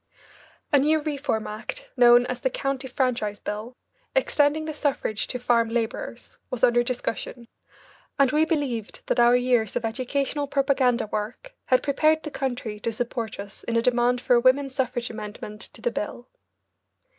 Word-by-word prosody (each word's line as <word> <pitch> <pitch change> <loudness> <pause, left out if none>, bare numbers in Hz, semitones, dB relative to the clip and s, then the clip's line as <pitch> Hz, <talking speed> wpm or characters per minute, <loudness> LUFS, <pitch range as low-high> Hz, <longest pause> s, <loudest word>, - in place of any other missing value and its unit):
A 285 - +7
new 310 +3 +3
Reform 290 -7 -2
Act, - - -6
known 245 -1 +7
as 250 0 -3
the 260 - 0
County 275 +1 -2
Franchise 245 -5 -1
Bill, 215 +4 -6 0.4
extending 310 -10 +2
the 310 - -4
suffrage 280 -8 -1
to 250 - -3
farm 235 -2 +2
labourers, 235 +1 -4
was 255 0 -4
under 240 -1 +5
discussion, 240 -1 -4 0.7
and 275 -2 +4
we 305 +1 +3
believed 280 - -2
that - - 0
our 240 +1 +6
years 245 -4 +2
of 235 - -1
educational 275 +5 -1
propaganda 270 -4 +2
work 215 - -5
had 255 - +3
prepared 310 +3 +2
the 305 - -6
country 245 -6 -3
to 230 - -2
support 230 -2 -4
us 200 -1 -9
in 230 - -2
a 230 - +4
demand 245 0 +2
for 250 - +2
a 240 - +6
women's 260 +2 +3
suffrage 245 -3 -1
amendment 210 -1 -8
to - - -13
the 240 - +1
bill. 235 +3 -5
245 Hz, 165 wpm, -25 LUFS, 230-275 Hz, 0.7 s, A